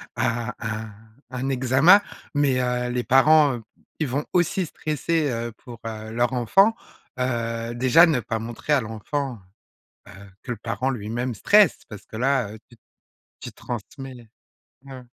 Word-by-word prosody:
a 120 +1 -1
un 110 -1 -5 0.4
un 130 +1 -3
examen 135 +9 +5 0.3
mais 140 -3 +2
heu, 125 0 -1
les 125 0 -1
parents, 140 0 +5 0.4
ils 155 - 0
vont 140 +4 -2
aussi 180 +1 +1
stresser, 155 0 -1
heu, 115 0 -3
pour, 120 +1 -12
heu, 110 0 -7
leur 120 +3 0
enfant, 195 - +4 0.4
heu, 115 -2 -2
déjà 130 +7 +6
ne 150 -5 +1
pas 115 -1 -3
montrer 120 +6 -3
à 140 - +3
l'enfant, 120 +3 -4 0.7
heu, - - -12 0.3
que 125 - -3
le - - -6
parent 115 +4 -2
lui-même 120 +1 -3
stresse 205 - +4
parce 105 -3 -11
que 110 - -10
là, 125 -3 +1
heu, 110 - -10
tu 120 - -17 0.7
tu - - -7
transmets 130 +3 -7
le 120 - -13 0.7
ouais. 130 -1 -9
125 Hz, 155 wpm, -24 LUFS, 115-140 Hz, 0.7 s, déjà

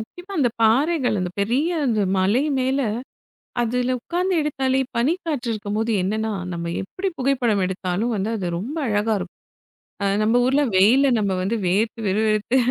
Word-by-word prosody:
முக்கியமா 355 - -10
அந்தப் 250 -7 +1
பாறைகள், 260 +2 +3
அந்தப் 180 -1 -4
பெரிய 250 +11 +1 0.2
அந்த 225 -4 +1 0.2
மலை 200 +8 +2 0.2
மேல 260 +2 +1 0.8
அதுல 250 +2 0
உட்காந்து 360 +8 -1
எடுத்தாலே, 270 -3 0 0.2
பனிக்காற்று 290 -1 -1
இருக்கும்போது 215 +2 -2
என்னன்னா, 220 +3 -1 0.2
நம்ம 170 0 -4
எப்படி 375 - -3
புகைப்படம் 245 -7 +1
எடுத்தாலும் 190 +5 -2
வந்து 200 +1 -1
அது 185 -4 -3
ரொம்ப 250 - -5
அழகா 210 +1 +1
இருக்கும். 180 -1 -7 0.7
அ - - +1 0.2
நம்ப 220 +3 +3
ஊர்ல 270 +3 +3 0.2
வெயில்ல 245 +9 +5
நம்ம 200 -2 0
வந்து 205 +5 0
வேர்த்து, 215 +6 +1
விறுவிறுத்து 215 +4 +1
225 Hz, 145 wpm, -22 LUFS, 205-265 Hz, 0.8 s, வெயில்ல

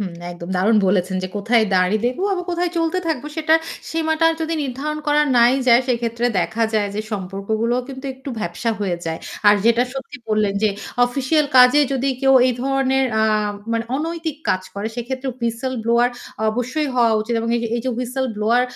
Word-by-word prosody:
হুম, 185 -4 -4 0.2
একদম 170 0 -9
দারুণ 210 +5 +3
বলেছেন 185 0 +1
যে, 185 - -3
কোথায় 225 +2 +2
দাঁড়ি 185 +3 +3
দেবো 255 +9 -2
আবার 360 -2 -2
কোথায় 350 0 -1
চলতে 330 +2 0
থাকবো 300 -4 -2
সেটা 315 0 +3 0.4
সীমাটার 325 0 +2
যদি 325 +1 -1
নির্ধারণ 285 +3 -3
করা 295 0 +4 0.2
নাই 240 +1 +6 0.2
যায় 235 +2 +6
সেক্ষেত্রে 235 -1 0
দেখা 220 +5 -1
যায় 210 -2 +1
যে 210 - -1
সম্পর্কগুলোও 215 +5 -2
কিন্তু 265 0 -9
একটু 265 +2 -10
ভ্যাপসা 175 +4 -2
হয়ে 185 -4 -1
যায়। 165 0 -3 0.3
আর 205 - +7
যেটা 235 +1 +4
সত্যি 270 0 -7
বললেন 215 -2 +1
যে, 215 - +4 0.4
অফিসিয়াল 275 +4 +1
কাজে 250 +3 +7
যদি 270 0 0
কেউ 270 0 +5
এই 255 - +2
ধরনের 270 0 +1 0.2
আ - - +3 0.5
মানে 230 0 0
অনৈতিক 325 0 -3
কাজ 185 - +1
করে 200 +2 -3
সেক্ষেত্রে 260 +2 -4
Whistle 235 +3 -2
ব্লোয়ার 235 +1 +3 0.4
অবশ্যই 255 +7 -2
হওয়া 235 -2 +4
উচিত। 225 +2 -2
এবং 230 +1 -2
এই - - -1
যে 230 - -2
এই - - -2
যে 260 - 0
Whistle 255 +1 -2
ব্লোয়ার 225 +4 +2
245 Hz, 185 wpm, -20 LUFS, 215-275 Hz, 0.5 s, আর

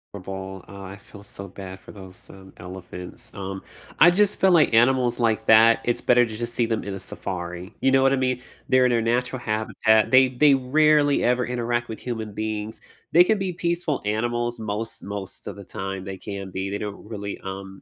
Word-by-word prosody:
ibble 95 0 -7
uh, 100 -1 -10
I 95 +1 -9
feel 100 -1 -15
so 100 -1 -9
bad 95 0 -9
for - - -13
those, 95 -2 -13
um, 95 0 -14
elephants. 90 0 -10
Um, 95 -1 -6 0.4
I 175 - +8
just 205 +2 +2
feel 190 - +4
like 160 -7 +5
animals 125 +1 +3
like 115 -2 +1
that, 115 +1 +7
it's 120 - 0
better 125 0 +4
to 110 -2 -4
just 120 +1 -4
see 115 -1 +1
them 115 -1 -1
in 100 - -5
a 95 - -6
safari, 90 -1 -6
you 135 - +3
know 135 0 +4
what 135 - +4
I - - +4
mean? 130 -1 -1 0.3
They're 130 0 +5
in 125 - +3
their 120 -1 +2
natural 125 +3 -1
habitat, 110 -1 +1
they 130 0 +7
they 140 +3 +4
rarely 145 +2 +3
ever 125 0 +2
interact 120 -1 -2
with 110 - -6
human 110 -4 -5
beings, 110 0 -4 0.3
they 175 +2 +7
can 215 +3 +1
be 190 -2 -2
peaceful 170 -4 -2
animals 120 +2 -1
most 110 +1 -4
most 100 -2 -7
of - - -6
the 100 - -10
time, 95 0 -6
they 95 -1 -6
can 100 -1 -7
be. 95 +1 -3
They 100 - -3
don't 105 0 -7
really, 100 -2 -6
um, 95 0 -8
110 Hz, 210 wpm, -24 LUFS, 95-125 Hz, 0.4 s, I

